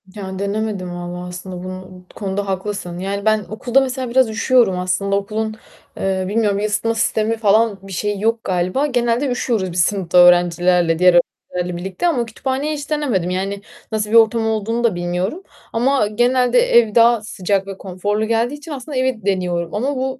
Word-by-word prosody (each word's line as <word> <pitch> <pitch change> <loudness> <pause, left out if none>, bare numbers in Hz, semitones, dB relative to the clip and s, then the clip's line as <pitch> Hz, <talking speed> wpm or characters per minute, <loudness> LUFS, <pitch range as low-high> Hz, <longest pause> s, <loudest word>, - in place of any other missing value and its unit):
Ya, 190 -2 -6
denemedim 200 -2 -2
vallahi, 175 0 -6
aslında, 180 0 -7
bunu, 185 0 -7 0.2
bu - - -18
konuda 200 -1 -3
haklısın. 190 -2 -4
Yani, 200 +2 -3
ben 215 -2 +2
okulda 240 +5 +1
mesela 260 -1 -3
biraz 255 -1 +3
üşüyorum 225 -3 +2
aslında, 195 +2 0
okulun, 215 +2 -2 0.4
eee, 190 -1 -1
bilmiyorum, 205 -1 +1
ısıtma 220 +2 0
sistemi 220 0 0
falan 215 -1 +2
bir 195 0 -12
şeyi 205 +2 -2
yok 225 +1 0
galiba, 185 +9 0
genelde 245 0 0
üşüyoruz 225 -7 -1
biz 175 - -2
sınıfta 180 0 +1
öğrencilerle, 175 -1 +4
diğer 180 0 +6 0.4
öğrencilerle 180 -1 -2
birlikte 190 - -2
ama 255 -9 +1
kütüphaneyi 265 +6 -3
hiç 290 -1 -6
denemedim. 255 - 0
Yani, 195 +2 -3 0.3
nasıl 215 -1 -1
bir - - +2
ortam 225 0 +4
olduğunu 225 +2 -1
da 225 -6 +2
bilmiyorum 180 - -3 0.3
ama 250 0 +2
genelde, 245 - +2
ev 235 - +3
daha 235 -1 +5
sıcak 195 -2 -2
ve 195 -1 -7
konforlu 205 +3 -2
geldiği 230 +4 0
için 295 +2 -11
aslında, 280 0 -5
evi 255 -5 -1
deniyorum 180 -3 -1
ama 265 +7 -1
bu 260 0 -3
210 Hz, 170 wpm, -19 LUFS, 185-235 Hz, 0.4 s, diğer